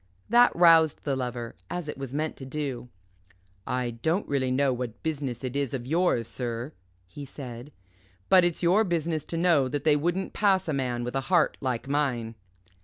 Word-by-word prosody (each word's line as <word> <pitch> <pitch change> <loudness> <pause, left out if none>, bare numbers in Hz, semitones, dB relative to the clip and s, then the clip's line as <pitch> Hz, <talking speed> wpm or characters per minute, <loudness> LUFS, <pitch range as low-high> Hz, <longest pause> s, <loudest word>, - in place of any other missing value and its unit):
That 240 +2 +6
roused 165 -3 +5
the 140 -2 -1
Lover, 125 -2 -4
as 175 -3 -4
it 150 - -4
was 135 -2 -6
meant 155 +3 -2
to - - -9
do. 135 -4 -4 0.8
"I 125 -1 -1
don't 160 - -1
really 135 -2 0
know 135 +1 +2
what 120 -2 -6
business 140 -6 -3
it 130 0 -4
is 140 -2 -1
of 120 -2 -5
yours, 155 -6 +1
sir," 120 +3 -4 0.3
he 145 +11 -10
said; 130 -1 -9 0.6
"but 185 -2 +6
it's 175 0 -1
your 185 +6 +4
business 165 -4 -1
to 165 - -4
know 165 -6 +3
that 145 +2 -3
they 155 -2 +4
wouldn't 175 +6 -1
pass 195 -3 +2
a 155 - -1
man 125 -3 -2
with 125 +2 -4
a 135 - +1
heart 175 -4 +3
like 130 -1 -2
mine." 130 -6 -1
140 Hz, 185 wpm, -27 LUFS, 125-165 Hz, 0.8 s, That